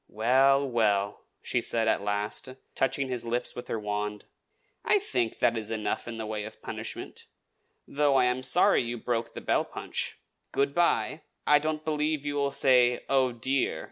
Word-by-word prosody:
"Well, 135 +5 +3
well," 105 -5 0 0.2
she - - 0
said 115 -1 0
at 110 - +2
last, 105 +5 -3 0.2
touching 135 +1 0
his 125 -2 -3
lips 120 +1 -2
with 125 - -7
her 115 - -2
wand, 105 0 -3 0.6
"I - - +4
think 125 - -1
that 115 - +2
is 110 -1 -4
enough 110 0 -2
in 115 -1 -5
the 110 - -4
way 105 -1 -3
of 110 - -9
punishment, - - -6 0.6
though 145 -1 +2
I 130 -1 +5
am 125 +1 0
sorry 130 -1 +4
you 120 0 -4
broke 115 0 -2
the - - -6
bell - - +1
punch. - - -3 0.3
Good 140 0 +1
by! 170 -1 +1 0.2
I 150 0 +6
don't 155 0 -3
believe 150 -1 -1
you 145 - -1
will 140 -1 +1
say 125 -3 +3
'Oh, 135 -2 +3
dear!' 130 +3 0
125 Hz, 175 wpm, -28 LUFS, 110-140 Hz, 0.6 s, I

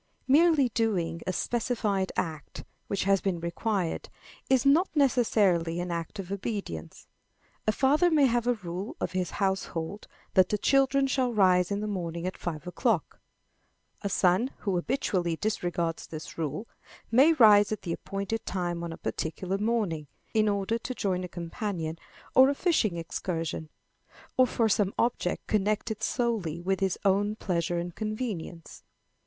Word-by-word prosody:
Merely 295 -1 +5
doing 185 -8 -1
a - - +2
specified 210 -2 -1
act, 155 -5 -4 0.2
which 200 - -1
has 195 0 +3
been 185 -3 -1
required, 175 +1 -2 0.4
is 260 0 +3
not 315 +7 +5
necessarily 205 - +2
an 175 0 -3
act 170 +4 -4
of 195 -1 -6
obedience. 200 - -5 0.6
A - - +5
father 290 +9 +3
may 305 -4 +4
have 240 -1 +1
a 245 - +3
rule 185 -1 -6
of - - -2
his 185 -1 -1
household 190 -1 -2 0.3
that 185 -2 +5
the 210 - +1
children 275 +4 +3
shall 260 -2 +1
rise 185 -5 +4
in 200 0 -1
the 215 - -2
morning 170 -4 -3
at 185 - -3
five 155 -4 -5
o'clock. 180 - -1 0.8
A 200 - -2
son 185 +6 +3
who 195 -3 -1
habitually 175 -3 0
disregards 175 -4 -2
this 155 -1 -8
rule, 160 - -3 0.4
may 270 +8 +6
rise 210 -7 +6
at 215 - -3
the 170 - -2
appointed 200 +5 -4
time 175 -2 -3
on 170 - -4
a 165 - -7
particular 185 +4 -3
morning, 205 -9 -1 0.3
in 215 -1 +3
order 200 +3 0
to 255 +2 -5
join 185 -4 -1
a - - -4
companion 170 -2 -4 0.4
on 260 +1 +8
a 285 - 0
fishing 260 - +1
excursion, 165 -1 -4 0.7
or 255 0 +5
for 230 -2 +1
some 205 -2 +1
object 230 -6 0
connected 215 +1 0
solely 215 -10 -1
with 190 +2 -1
his 190 -2 0
own 205 +2 +2
pleasure 175 -4 -1
and 175 0 -3
convenience. 215 -6 -5
195 Hz, 155 wpm, -28 LUFS, 175-230 Hz, 0.8 s, on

